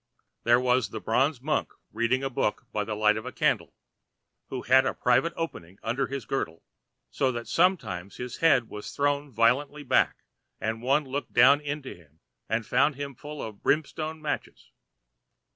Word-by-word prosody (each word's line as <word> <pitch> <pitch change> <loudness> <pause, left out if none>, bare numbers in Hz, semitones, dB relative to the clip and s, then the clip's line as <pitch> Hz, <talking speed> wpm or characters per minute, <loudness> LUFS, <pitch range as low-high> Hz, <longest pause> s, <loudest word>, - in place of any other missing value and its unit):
There 120 +1 +5
was 125 -1 +2
the 110 - -5
bronze 130 +5 +1
monk 150 +3 -1 0.2
reading 115 +4 +1
a 135 - 0
book 105 - -1
by 105 - -1
the 105 0 -4
light 105 0 +3
of 110 - -6
a - - -4
candle, - - 0 0.7
who 130 - -5
had 130 +1 +5
a - - -1
private 130 +7 +2
opening 95 - -5
under 125 +4 0
his 135 -4 -5
girdle, 85 -10 -3 0.5
so 130 -1 +1
that 120 -1 -5
sometimes 110 - 0
his 125 0 -6
head 135 -8 +4
was 105 - -8
thrown 145 0 0
violently 135 +6 +2
back, 130 - +2 0.4
and 110 +1 -2
one 140 +4 +2
looked 135 +2 -4
down 145 +1 +6
into 145 -2 -5
him 80 -2 -21 0.3
and 110 +1 0
found 135 +5 +2
him 140 0 -5
full 150 +4 -8
of 105 -2 -8
brimstone 155 +1 -1
matches. 150 - -5
130 Hz, 170 wpm, -27 LUFS, 110-145 Hz, 0.7 s, down